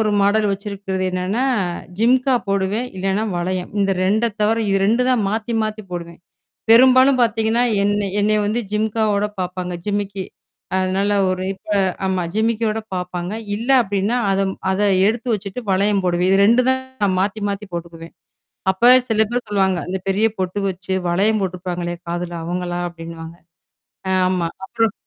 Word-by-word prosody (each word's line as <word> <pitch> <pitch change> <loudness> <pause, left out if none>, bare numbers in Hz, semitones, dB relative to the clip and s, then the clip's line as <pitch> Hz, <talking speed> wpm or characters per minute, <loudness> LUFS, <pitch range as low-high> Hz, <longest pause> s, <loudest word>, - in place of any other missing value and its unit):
ஒரு 215 -1 +2
மாடல் 210 +1 +3
வச்சிருக்கிறது 195 -1 -4
என்னன்னா, 185 +7 -1 0.5
ஜிம்கா 255 +3 +3
போடுவேன். 200 +5 0
இல்லன்னா 195 +3 0
வளையம். 180 +1 -2
இந்த 195 0 +2
2அ 215 +5 +2 0.2
தவிர 215 +2 +3
இது 195 - +3
2தான் 250 +2 +2
மாத்தி 220 +2 -2
மாத்தி 215 0 -3
போடுவேன். 170 -1 -7 0.5
பெரும்பாலும் 255 +2 +6
பார்த்தீங்கன்னா, 225 +1 +1 0.2
என்ன 205 0 +1
என்னைய 215 +1 +2
வந்து 220 +4 0
ஜிம்காவோட 210 -1 +1 0.2
பார்ப்பாங்க. 180 0 -4
ஜிமிக்கி. 200 -2 -2 0.5
அதனால 190 +2 0 0.2
ஒரு 185 0 -2
இப்ப - - -27 0.4
ஆமா 190 -1 0
ஜிமிக்கியோட 220 0 0
பாரப்பாங்க. 180 +1 -4 0.2
இல்ல 230 +4 -6
அப்டின்னா, 200 +3 -1
அத 195 0 +1 0.3
அத 190 - -1 0.3
எடுத்து 230 +3 -2
வச்சுட்டு 200 +3 -5
வளையம் 200 +1 +2
போடுவேன். 180 0 +1
இது 195 - +4
2 235 +4 +5
தான் 260 -7 -1
மாத்தி, 205 +2 -1
மாத்தி 200 +1 -5
போட்டுக்குவேன். 165 -1 -8 0.6
அப்ப 190 +5 0 0.2
சில 220 -1 +2
பேர் 245 +1 -2
சொல்லுவாங்க. 190 -3 +1
அந்த 185 +1 -2
பெரிய 195 +3 +2
பொட்டு 185 +1 -2
வச்சு 190 +1 -4 0.2
வளையம் 205 +5 +2
போட்டுருப்பாங்களல்லையே! 175 -2 -4
காதுல 175 0 -3
அவங்களா? 175 0 -3
அப்ப்டின்னுவாங்க. 165 0 -9 0.8
ஆமா. 185 -2 +1 0.2
அப்புறம் 225 +2 0
200 Hz, 140 wpm, -20 LUFS, 185-220 Hz, 0.8 s, பெரும்பாலும்